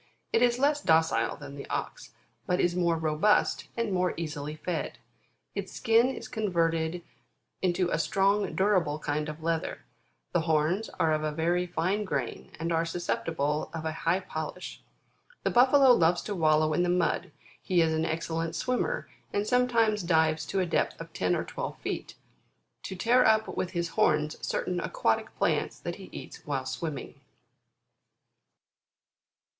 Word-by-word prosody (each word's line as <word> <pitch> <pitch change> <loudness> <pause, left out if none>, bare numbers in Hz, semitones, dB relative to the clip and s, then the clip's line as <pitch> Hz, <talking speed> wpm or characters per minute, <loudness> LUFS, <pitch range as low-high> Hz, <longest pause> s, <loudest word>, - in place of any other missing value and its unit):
It 230 - +4
is 240 -1 +4
less 290 +2 +2
docile 160 - +2
than - - -9
the 140 - -9
Ox, - - -4 0.4
but 180 - +1
is 175 0 +2
more 170 -2 +2
robust, 160 +6 +2
and 230 -4 0
more 180 -1 +1
easily 150 -2 -4
fed. 165 +2 -3 0.6
Its - - -5
skin 230 0 +4
is 265 - -6
converted 170 -4 0 0.6
into 180 -1 +1
a - - +1
strong, 200 +1 +1
dura 195 -1 +4
ble 150 -2 -3
kind 150 0 -2
of 155 +1 -8
leather; 165 -1 -2 0.5
the 175 - +2
horns 160 +6 +1
are 160 -1 +3
of 155 0 0
a 155 - 0
very 170 +3 0
fine 180 +5 0
grain, 135 - -4
and 165 +1 -2
are 165 0 +2
susceptible 160 -3 -1
of 160 -1 -5
a 160 - 0
high 165 +3 0
polish. 160 +1 -6 0.6
The - - +1
Buffalo 260 +2 +6
loves 175 -6 +4
to 210 - -3
wallow 155 -2 +3
in 175 - +2
the 175 - +1
mud; 175 -1 +1 0.3
he 185 -3 +1
is 160 -1 +1
an 160 0 0
excellent 165 0 -2
swimmer, 360 - -1 0.2
and 205 +1 0
sometimes 230 -3 +2
dives 160 -3 +2
to 195 - -1
a - - +1
depth 170 - 0
of 165 0 -9
ten 90 -1 +1
or - - -1
twelve - - -5
feet, - - -5 0.7
to 190 - -5
tear 240 +7 +4
up 220 -1 +3
with 180 - -1
his 170 -1 -1
horns 150 -1 +1
certain 180 -1 -1
aquatic 115 -8 -1
plants - - 0
that - - -5
he - - -10
eats - - -9
while 135 -3 -2
swimming. 140 +3 -5
170 Hz, 160 wpm, -28 LUFS, 155-195 Hz, 0.7 s, Buffalo